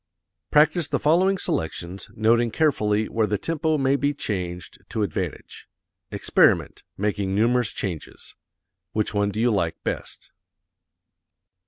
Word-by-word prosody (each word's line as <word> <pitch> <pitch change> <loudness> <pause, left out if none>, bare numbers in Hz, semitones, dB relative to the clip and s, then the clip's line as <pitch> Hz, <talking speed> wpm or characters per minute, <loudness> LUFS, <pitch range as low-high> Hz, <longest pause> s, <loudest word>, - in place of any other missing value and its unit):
Practise 155 +2 +4
the - - 0
following 185 +6 +3
selections, 85 - -3
noting 115 +2 +3
carefully 110 -6 +1
where 110 -2 0
the 105 0 0
tempo 160 - 0
may 135 0 +2
be 145 +1 0
changed 90 - -4
to 110 - -1
advantage. 95 -7 -5 0.4
Experiment, - - +2 0.2
making 100 -1 -1
numerous 120 +2 +2
changes. 90 -6 -6 0.6
Which 105 -1 -1
one 100 0 +1
do 105 - -4
you 120 +1 +3
like 85 -6 0
best? - - -5
110 Hz, 125 wpm, -24 LUFS, 100-145 Hz, 0.6 s, Practise